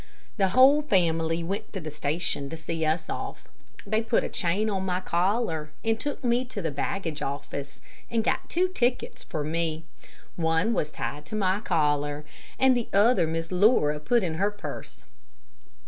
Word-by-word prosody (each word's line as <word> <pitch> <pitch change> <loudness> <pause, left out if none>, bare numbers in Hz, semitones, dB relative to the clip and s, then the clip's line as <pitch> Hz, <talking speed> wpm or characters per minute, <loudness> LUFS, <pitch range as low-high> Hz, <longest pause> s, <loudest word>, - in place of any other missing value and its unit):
The 195 -3 +3
whole 260 +8 +6
family 165 - +1
went 195 +4 -4
to 195 - -3
the 155 -3 -6
station 145 -1 -1
to 165 - -6
see 160 0 -3
us 160 +2 0
off. - - -5 0.4
They 215 +2 +1
put 230 +1 +1
a - - -3
chain 185 +5 0
on 195 -3 -1
my 180 -1 0
collar 175 -3 0 0.2
and 225 0 +1
took 290 0 -4
me 240 +1 +2
to 240 -4 -6
the 165 -5 -2
baggage 160 +2 -3
office 140 0 -5 0.3
and 230 -1 +1
got - - -1
two 360 +2 +2
tickets 250 -8 -1
for 150 - -3
me. 160 +1 -1 0.5
One 165 +6 +2
was 150 - 0
tied 150 0 -5
to 190 - -5
my 195 -1 +1
collar 145 -5 0 0.3
and 265 -1 +5
the 240 -2 -1
other 205 -3 +4
Miss 165 +1 -3
Laura 180 -6 +4
put 235 +9 +2
in 160 -3 -2
her 200 - +3
purse. 205 0 -8
175 Hz, 175 wpm, -27 LUFS, 160-220 Hz, 0.5 s, whole